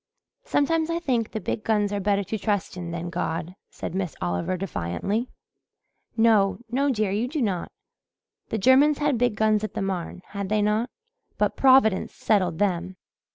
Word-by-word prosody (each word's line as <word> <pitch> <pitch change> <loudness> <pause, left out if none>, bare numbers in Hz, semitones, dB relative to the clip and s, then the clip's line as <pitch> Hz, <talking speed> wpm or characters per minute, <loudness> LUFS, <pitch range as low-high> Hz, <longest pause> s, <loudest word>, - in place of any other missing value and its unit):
"Sometimes 320 +2 +1
I 335 - 0
think 250 -10 0
the 220 - -4
big 210 +2 -3
guns 210 -2 +1
are 205 - -1
better 200 0 +1
to 220 - -3
trust 205 -3 -1
in 175 -2 -6
than 170 0 -4
God," 170 0 -3 0.2
said - - -6
Miss 185 -3 -3
Oliver 90 - -1
defiantly. 195 - -2 0.9
"No, 210 -4 +4
no, 275 +3 +1
dear, 215 -5 0
you 215 +5 0
do 300 +4 -3
not. 195 -8 -1 0.8
The 220 - -1
Germans 270 +7 +5
had 295 -1 +1
the - - 0
big 245 -3 +2
guns 215 0 +2
at 215 - -4
the - - -2
Marne, 185 -1 -4
had 200 -2 -4
they 215 0 +2
not? 215 +4 +1 0.5
But - - +1
Providence 260 -7 +4
settled 185 -6 +1
them. 185 -1 -1
210 Hz, 175 wpm, -25 LUFS, 185-235 Hz, 0.9 s, Germans